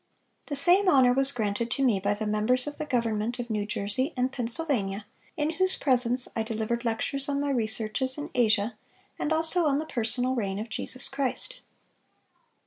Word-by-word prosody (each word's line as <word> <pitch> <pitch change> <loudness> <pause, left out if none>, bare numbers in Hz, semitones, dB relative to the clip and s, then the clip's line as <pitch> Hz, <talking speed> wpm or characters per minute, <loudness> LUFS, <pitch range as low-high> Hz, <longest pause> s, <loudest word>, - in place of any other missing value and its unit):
The 290 - -4
same 360 +7 +4
honor 260 -5 +5
was 270 +1 +4
granted 225 -1 -2
to 275 +3 -1
me 220 -6 +2
by 200 +2 -1
the 215 +1 -5
members 215 +4 +1
of 295 +1 -7
the 305 - -4
government 230 -2 -1
of 240 -2 -6
New 210 -1 -2
Jersey 210 +9 -2
and 250 +1 0
Pennsylvania, 230 -6 -2 0.3
in 300 +1 0
whose 375 +3 +1
presence 250 -2 +2
I 225 - -1
delivered 225 +1 -3
lectures 255 +4 -1
on 280 0 -1
my 285 0 -1
researches 235 +2 -1
in 295 - -6
Asia, 220 -3 +1 0.4
and 300 - -2
also 325 +2 +5
on 280 -2 +2
the 310 - -3
personal 245 0 0
reign 200 -6 -3
of 220 +3 -6
Jesus 255 +4 -1
Christ." 275 - 0
245 Hz, 180 wpm, -26 LUFS, 220-280 Hz, 0.4 s, honor